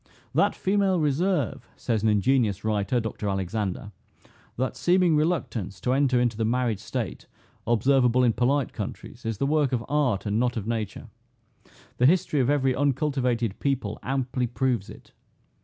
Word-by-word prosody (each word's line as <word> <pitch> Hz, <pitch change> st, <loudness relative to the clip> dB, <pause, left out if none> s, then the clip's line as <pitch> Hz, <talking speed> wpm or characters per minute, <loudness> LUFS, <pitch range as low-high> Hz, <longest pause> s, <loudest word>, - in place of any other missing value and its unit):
"That -, -, +2 dB
female 195 Hz, -2 st, +1 dB
reserve," 155 Hz, -, 0 dB
says 110 Hz, -3 st, -1 dB
an 110 Hz, -, +2 dB
ingenious 105 Hz, -1 st, +2 dB
writer, 110 Hz, +3 st, +1 dB
[Dr 110 Hz, -2 st, -3 dB
Alexander,] 95 Hz, +2 st, -3 dB, 0.7 s
"that 130 Hz, +1 st, -1 dB
seeming 175 Hz, -2 st, +3 dB
reluctance 135 Hz, -, -1 dB
to 125 Hz, -, +1 dB
enter 135 Hz, -2 st, +3 dB
into 120 Hz, -2 st, +1 dB
the 110 Hz, -, -1 dB
married 115 Hz, -2 st, 0 dB
state, -, -, -5 dB, 0.4 s
observable 125 Hz, +2 st, +3 dB
in 120 Hz, -2 st, +3 dB
polite 130 Hz, +3 st, +1 dB
countries, 115 Hz, +3 st, -7 dB
is 115 Hz, -2 st, -2 dB
the 140 Hz, -, 0 dB
work 145 Hz, -2 st, +2 dB
of 120 Hz, -1 st, -1 dB
art, 140 Hz, -10 st, 0 dB
and 105 Hz, +1 st, 0 dB
not 120 Hz, 0 st, 0 dB
of 105 Hz, -, -3 dB
nature. 110 Hz, -3 st, -4 dB, 0.9 s
The 125 Hz, -, +5 dB
history 170 Hz, -2 st, +2 dB
of 130 Hz, 0 st, +2 dB
every 135 Hz, -3 st, +2 dB
uncultivated 130 Hz, -6 st, 0 dB
people 130 Hz, -7 st, -2 dB
amply 125 Hz, -1 st, -1 dB
proves 120 Hz, -4 st, -1 dB
it. -, -, -13 dB
125 Hz, 155 wpm, -26 LUFS, 110-140 Hz, 0.9 s, The